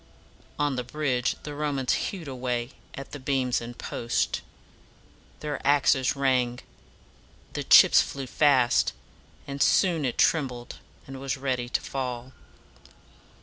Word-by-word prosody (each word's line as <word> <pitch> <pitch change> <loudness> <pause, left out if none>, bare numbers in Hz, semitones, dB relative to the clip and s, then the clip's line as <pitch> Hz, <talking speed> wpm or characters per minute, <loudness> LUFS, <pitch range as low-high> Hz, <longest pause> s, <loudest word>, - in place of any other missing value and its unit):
On 145 -3 0
the 125 - -1
bridge 125 -2 -1
the 150 - -6
Romans 145 -3 -1
hewed 180 -6 -3
away 125 -2 -3 0.2
at 135 - -8
the 145 - -7
beams 130 -2 0
and 120 +1 -8
posts. 120 0 -2 1.0
Their 150 -1 -4
axes 140 -2 +3
rang, 130 -3 +1 1.0
the - - -3
chips - - +7
flew 135 -1 -5
fast; 130 0 +3 0.5
and 140 0 -6
soon 175 -5 +3
it 125 -3 -2
trembled, 125 -6 0 0.3
and 135 0 -9
was 135 0 -2
ready 130 -2 -2
to - - 0
fall. 130 -1 -5
130 Hz, 125 wpm, -26 LUFS, 125-145 Hz, 1.0 s, chips